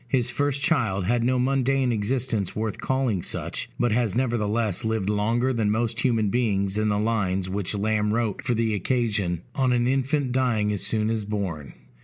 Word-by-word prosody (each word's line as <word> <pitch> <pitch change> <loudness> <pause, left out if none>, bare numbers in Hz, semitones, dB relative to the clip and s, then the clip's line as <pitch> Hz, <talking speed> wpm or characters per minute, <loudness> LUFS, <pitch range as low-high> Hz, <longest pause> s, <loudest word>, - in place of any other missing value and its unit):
His 120 -1 +1
first 140 +1 0
child 105 - +1
had 120 +3 +1
no 130 +1 +2
mundane 135 0 +1
existence 110 -2 -1
worth 110 -1 -3
calling 130 -8 0
such; - - -1
but 120 -1 +2
has 115 -3 +1
nevertheless 115 -5 0
lived 110 -3 0
longer 115 +5 +1
than 110 -3 0
most 115 +2 0
human 115 -4 +1
beings 100 -5 0
in 110 0 +1
the 105 - +1
lines 100 -4 0
which 100 +1 -1
Lamb 105 0 0
wrote 115 -2 -1
for 125 - 0
the 110 -1 0
occasion, 105 -6 -1
On 130 -2 +1
an 120 -1 +2
Infant 135 +1 0
dying 120 -5 +1
as 100 - -3
soon 110 0 +1
as 110 -2 -1
born. 95 -8 -4
110 Hz, 180 wpm, -25 LUFS, 105-125 Hz, -, no